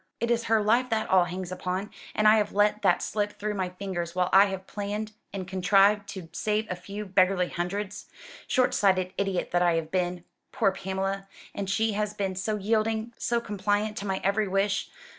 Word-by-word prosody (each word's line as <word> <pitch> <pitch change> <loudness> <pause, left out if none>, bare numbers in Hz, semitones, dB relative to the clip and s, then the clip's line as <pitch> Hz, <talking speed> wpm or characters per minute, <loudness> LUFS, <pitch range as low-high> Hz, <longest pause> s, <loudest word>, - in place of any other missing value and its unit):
It 235 +1 0
is 230 -1 +1
her 220 -1 +3
life 240 +4 +3
that 220 -2 0
all 185 -2 +6
hangs 180 +1 -5
upon: 185 +2 -3 0.2
and 215 - +3
I 215 +1 +7
have 210 -1 0
let 210 +1 +3
that 200 - +3
slip 210 -1 -2
through 210 +1 -2
my 190 -3 -2
fingers 180 -2 -5
while 180 0 +1
I 195 +1 +8
have 190 -1 -5
planned 210 +2 -4 0.2
and 190 -2 -5
contrived 195 +2 +3
to 185 -4 -7
save 210 +5 -1
a - - -1
few 200 +4 -7
beggarly 185 -1 +2
hundreds. 195 +4 -4 0.4
Short 255 -2 +2
sighted 185 -2 +2
idiot 195 -2 -1
that 175 - +2
I 175 -1 +3
have 160 -1 -2
been! 180 -1 -1 0.3
Poor 200 -4 +2
Pamela! 195 +1 -3 0.3
And 200 -1 -4
she 220 +2 +1
has 210 0 -2
been 195 -2 -1
so 190 +4 -2
yielding, 220 +2 0
so 235 0 +1
compliant 210 -1 -1
to 205 - -4
my 190 0 -1
every 200 +2 +1
wish! 195 +1 0
200 Hz, 200 wpm, -27 LUFS, 185-210 Hz, 0.4 s, I